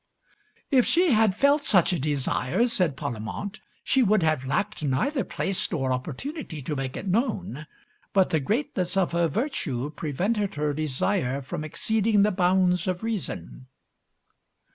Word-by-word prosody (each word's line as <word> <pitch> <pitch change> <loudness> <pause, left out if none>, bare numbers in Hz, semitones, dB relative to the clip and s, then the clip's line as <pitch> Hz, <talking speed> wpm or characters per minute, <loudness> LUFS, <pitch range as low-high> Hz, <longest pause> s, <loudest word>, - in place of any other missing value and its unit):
"If 255 -3 +4
she 345 -1 +3
had 220 -4 +4
felt 285 +5 +3
such 185 - +4
a 175 - -1
desire," 145 - +1
said 180 - +1
Parlamente, 120 - -5 0.2
"she 265 - +3
would 215 -5 +3
have 155 -4 +1
lacked 205 +8 -1
neither 160 - 0
place 195 +2 -2
nor 135 -6 0
opportunity 160 - -5
to 150 +3 -3
make 135 -1 -4
it - - -6
known; 185 - -1 0.4
but 190 -2 +3
the 160 - +2
greatness 190 - -1
of 190 -2 +2
her 170 0 +2
virtue 150 - -2
prevented 195 - -1
her 150 0 0
desire 150 -1 -1
from 150 - -5
exceeding 215 +6 +1
the 210 - +3
bounds 180 0 +2
of 180 +1 -2
reason." 65 - -4
180 Hz, 145 wpm, -26 LUFS, 145-215 Hz, 0.4 s, If